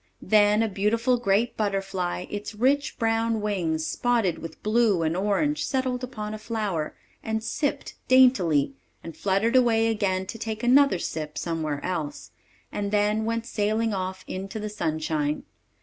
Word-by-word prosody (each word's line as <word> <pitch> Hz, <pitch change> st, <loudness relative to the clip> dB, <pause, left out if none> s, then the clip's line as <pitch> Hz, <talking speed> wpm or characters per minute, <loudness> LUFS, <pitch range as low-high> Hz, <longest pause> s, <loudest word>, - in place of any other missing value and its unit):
Then 210 Hz, +1 st, +4 dB
a -, -, +1 dB
beautiful 225 Hz, +5 st, +1 dB
great 230 Hz, +1 st, +1 dB
butterfly, 195 Hz, -4 st, -2 dB
its 205 Hz, +1 st, -5 dB
rich 270 Hz, +6 st, +1 dB
brown 225 Hz, -1 st, +1 dB
wings 175 Hz, -7 st, -1 dB
spotted 230 Hz, -8 st, 0 dB
with 165 Hz, -, -9 dB
blue 215 Hz, -5 st, +3 dB
and 160 Hz, +1 st, 0 dB
orange, 210 Hz, +11 st, +1 dB
settled 260 Hz, -2 st, -1 dB
upon 215 Hz, -4 st, -5 dB
a 215 Hz, -, -6 dB
flower, 210 Hz, -8 st, -3 dB, 0.3 s
and 220 Hz, 0 st, -2 dB
sipped 285 Hz, +3 st, -2 dB
daintily, 185 Hz, -, +4 dB, 0.3 s
and 165 Hz, -, -8 dB
fluttered 200 Hz, +5 st, +1 dB
away 225 Hz, -3 st, +4 dB
again 190 Hz, -4 st, 0 dB
to 225 Hz, +4 st, -7 dB
take 220 Hz, 0 st, -4 dB
another 270 Hz, -2 st, +5 dB
sip 155 Hz, -3 st, -5 dB
somewhere 155 Hz, -4 st, -2 dB
else, 165 Hz, -5 st, -4 dB, 0.4 s
and 200 Hz, -1 st, -2 dB
then 210 Hz, +1 st, +1 dB
went 230 Hz, 0 st, -1 dB
sailing 220 Hz, +1 st, 0 dB
off 185 Hz, -1 st, -4 dB
into 195 Hz, +3 st, -5 dB
the 215 Hz, 0 st, -4 dB
sunshine. 155 Hz, -6 st, -1 dB
210 Hz, 150 wpm, -26 LUFS, 185-230 Hz, 0.4 s, another